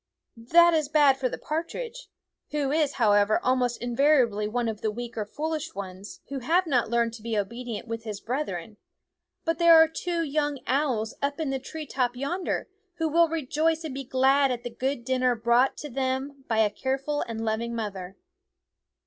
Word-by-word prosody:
That 335 Hz, +9 st, +5 dB
is 310 Hz, -3 st, +1 dB
bad 290 Hz, -3 st, +5 dB
for 255 Hz, -1 st, 0 dB
the -, -, -5 dB
par 315 Hz, +2 st, -2 dB
tridge, -, -, -8 dB, 0.4 s
who 290 Hz, -2 st, -1 dB
is, 300 Hz, -2 st, +1 dB
however, 205 Hz, -2 st, +3 dB
almost 250 Hz, -1 st, +1 dB
invariably 240 Hz, -4 st, +2 dB
one 235 Hz, +2 st, -1 dB
of 220 Hz, -1 st, -4 dB
the 220 Hz, -, 0 dB
weak 235 Hz, +2 st, -6 dB
or 215 Hz, -2 st, -2 dB
foolish 315 Hz, +5 st, -4 dB
ones 195 Hz, 0 st, -8 dB
who 275 Hz, -1 st, -3 dB
have 335 Hz, +9 st, +2 dB
not 250 Hz, -8 st, +1 dB
learned 235 Hz, -1 st, +1 dB
to 230 Hz, -, -10 dB
be 225 Hz, -1 st, -2 dB
obedient 235 Hz, +2 st, -4 dB
with 230 Hz, 0 st, -5 dB
his 210 Hz, -3 st, -5 dB
brethren, 220 Hz, -, -4 dB, 0.7 s
but 330 Hz, 0 st, 0 dB
there 340 Hz, -1 st, +8 dB
are 320 Hz, 0 st, +8 dB
two 335 Hz, +1 st, -2 dB
young 290 Hz, -1 st, -1 dB
owls 255 Hz, -5 st, 0 dB
up 285 Hz, +2 st, -1 dB
in 305 Hz, -4 st, -1 dB
the 270 Hz, -, -1 dB
tree 310 Hz, +4 st, -7 dB
top 250 Hz, -3 st, -1 dB
yonder, 315 Hz, +9 st, -2 dB, 0.3 s
who 325 Hz, -2 st, -1 dB
will 335 Hz, +1 st, +4 dB
rejoice 320 Hz, +1 st, 0 dB
and 310 Hz, -4 st, -5 dB
be 275 Hz, +1 st, -5 dB
glad 270 Hz, +2 st, +3 dB
at 245 Hz, -2 st, -3 dB
the 240 Hz, -, -5 dB
good 255 Hz, 0 st, -3 dB
dinner 255 Hz, -1 st, +2 dB
brought 235 Hz, +3 st, +3 dB
home -, -, -42 dB
to 295 Hz, -, -6 dB
them 265 Hz, +1 st, -3 dB
by 225 Hz, -, 0 dB
a 215 Hz, -2 st, +3 dB
careful 275 Hz, +5 st, -2 dB
and 225 Hz, -1 st, -4 dB
loving 230 Hz, +2 st, -2 dB
mother. 195 Hz, -4 st, -5 dB
260 Hz, 190 wpm, -26 LUFS, 230-300 Hz, 0.7 s, there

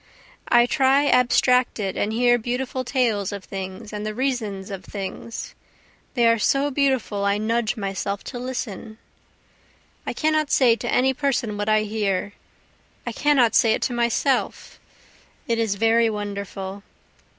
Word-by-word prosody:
I 240 Hz, 0 st, +5 dB
lie 270 Hz, +2 st, +4 dB
abstracted 250 Hz, -5 st, +2 dB
and 210 Hz, -, -1 dB
hear 240 Hz, +1 st, +3 dB
beautiful 250 Hz, +2 st, -3 dB
tales 235 Hz, -6 st, 0 dB
of 200 Hz, -1 st, -6 dB
things 190 Hz, +3 st, -7 dB
and 210 Hz, 0 st, -4 dB
the 215 Hz, 0 st, -4 dB
reasons 220 Hz, -7 st, -2 dB
of 190 Hz, -1 st, -6 dB
things, 205 Hz, +4 st, -6 dB, 0.6 s
They 240 Hz, -2 st, +4 dB
are 230 Hz, 0 st, +3 dB
so 280 Hz, +6 st, +1 dB
beautiful 260 Hz, -7 st, 0 dB
I 200 Hz, 0 st, +2 dB
nudge 225 Hz, +2 st, -1 dB
myself 200 Hz, 0 st, -3 dB
to 245 Hz, -, -7 dB
listen. 235 Hz, -4 st, -5 dB, 1.1 s
I -, -, -2 dB
cannot 310 Hz, -1 st, +1 dB
say 245 Hz, -6 st, +4 dB
to 240 Hz, +1 st, -4 dB
any 265 Hz, +1 st, +3 dB
person 255 Hz, -6 st, -1 dB
what 205 Hz, +1 st, -2 dB
I 215 Hz, 0 st, +4 dB
hear 205 Hz, -2 st, -2 dB, 0.7 s
I -, -, -3 dB
cannot 275 Hz, -6 st, +3 dB
say 225 Hz, -1 st, +4 dB
it -, -, -2 dB
to 250 Hz, -, -1 dB
myself 240 Hz, +3 st, -1 dB, 0.7 s
it 230 Hz, -1 st, 0 dB
is 220 Hz, -3 st, 0 dB
very 225 Hz, +2 st, +3 dB
wonderful. 200 Hz, -2 st, -5 dB
230 Hz, 145 wpm, -23 LUFS, 205-250 Hz, 1.1 s, I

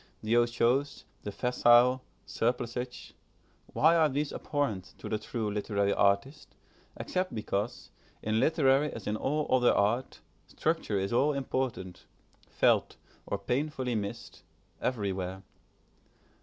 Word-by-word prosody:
The 110 Hz, +2 st, +1 dB
otiose, 120 Hz, +4 st, +1 dB, 0.2 s
the 105 Hz, -, -5 dB
facile, 125 Hz, +2 st, +4 dB, 0.2 s
surplusage: 125 Hz, +1 st, -3 dB, 0.5 s
why 160 Hz, +2 st, +3 dB
are 160 Hz, -2 st, +4 dB
these 145 Hz, +2 st, -2 dB
abhorrent 105 Hz, -11 st, -3 dB
to -, -, -8 dB
the 110 Hz, -, -1 dB
true 110 Hz, -1 st, -3 dB
literary 100 Hz, -1 st, 0 dB
artist, 100 Hz, +9 st, 0 dB, 0.4 s
except 185 Hz, 0 st, -2 dB
because, 105 Hz, +2 st, -3 dB, 0.3 s
in 110 Hz, +1 st, +1 dB
literary 145 Hz, 0 st, +3 dB
as 110 Hz, -, -8 dB
in 105 Hz, -, -1 dB
all 150 Hz, +7 st, -1 dB
other 125 Hz, -1 st, +4 dB
art, 115 Hz, +6 st, 0 dB, 0.3 s
structure 160 Hz, -10 st, -1 dB
is 95 Hz, +3 st, -1 dB
all 145 Hz, +5 st, +3 dB
important, 130 Hz, -9 st, -3 dB, 0.4 s
felt, -, -, +2 dB, 0.3 s
or 100 Hz, -, -1 dB
painfully 130 Hz, +4 st, -2 dB
missed, 100 Hz, -2 st, -5 dB, 0.4 s
everywhere? 95 Hz, -5 st, -2 dB
120 Hz, 115 wpm, -30 LUFS, 105-135 Hz, 0.5 s, facile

